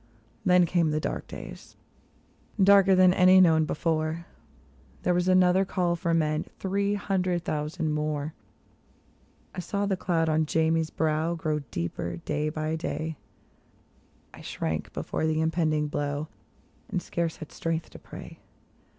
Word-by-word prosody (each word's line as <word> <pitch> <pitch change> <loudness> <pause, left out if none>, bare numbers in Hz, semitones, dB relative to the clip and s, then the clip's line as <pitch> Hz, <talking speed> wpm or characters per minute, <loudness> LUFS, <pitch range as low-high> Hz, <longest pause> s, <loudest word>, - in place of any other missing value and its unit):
Then 180 -1 +5
came 170 -1 +1
the 155 0 0
dark - - -4
days, - - -10 0.8
darker 195 0 +6
than 185 -1 +6
any 185 0 +6
known 160 -3 +5
before; 160 +1 -1 0.8
There 180 - +2
was 180 +1 +1
another 185 0 +5
call 180 -2 0
for 170 0 -2
men—'' 155 -2 +1
three 200 +1 0
hundred 185 -3 -1
thousand 155 +2 -2
more; 150 0 -2 0.6
" - - -35
I - - -6
saw 200 +3 -2
the 195 -1 +1
cloud 170 -3 0
on 155 0 +1
Jamie's 160 0 +1
brow 160 +2 0
grow 155 -2 -1
deeper 85 0 -4
day 150 - -2
by 155 0 -2
day; 160 -1 -3 1.2
I - - -12
shrank 80 -1 -3
before 160 - -2
the 155 0 0
impending 160 -2 +1
blow, 145 +1 -3 0.6
and 190 - -1
scarce 170 -2 -2
had 155 - -10
strength 165 0 -3
to - - -11
pray. - - -11
160 Hz, 140 wpm, -27 LUFS, 155-180 Hz, 1.2 s, darker